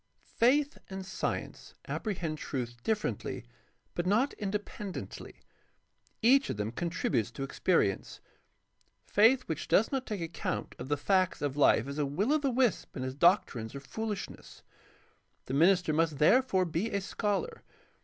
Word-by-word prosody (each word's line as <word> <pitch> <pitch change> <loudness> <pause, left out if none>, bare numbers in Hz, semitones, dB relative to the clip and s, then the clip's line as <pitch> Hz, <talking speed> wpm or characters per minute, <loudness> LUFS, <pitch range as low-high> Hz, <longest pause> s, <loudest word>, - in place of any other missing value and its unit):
— - - -38 0.2
Faith 280 +5 +3
and 190 -1 -6
science 190 - -4
apprehend 170 -8 -3
truth 120 -5 -4
differently 205 - -2 0.5
but 175 +1 -2
not 230 +9 +2
independently. 205 -1 -6 0.8
Each 270 +4 +5
of - - -2
them 105 +1 -2
contributes 165 - -1
to 130 +3 -6
experience. 135 - 0 0.9
Faith 235 +5 +4
which 160 - -4
does 220 - +3
not 265 -2 -2
take 210 -5 -3
account 165 0 -3
of 125 - -6
the 145 +1 0
facts 185 +2 +1
of 140 -2 -1
life 140 -4 +4
is 140 +2 -5
a 145 - +2
will 200 - +1
o' 310 - +3
the 280 -2 0
wisp 250 -3 +1
and 130 - -3
its 130 - -3
doctrines 140 - +2
are - - -4
foohshness. 210 +8 -6 0.8
The - - -5
minister 175 +2 +4
must 160 -1 +1
therefore 190 - +4
be 170 +6 -1
a 200 - -1
scholar. 210 - -2
185 Hz, 150 wpm, -31 LUFS, 145-220 Hz, 0.9 s, Each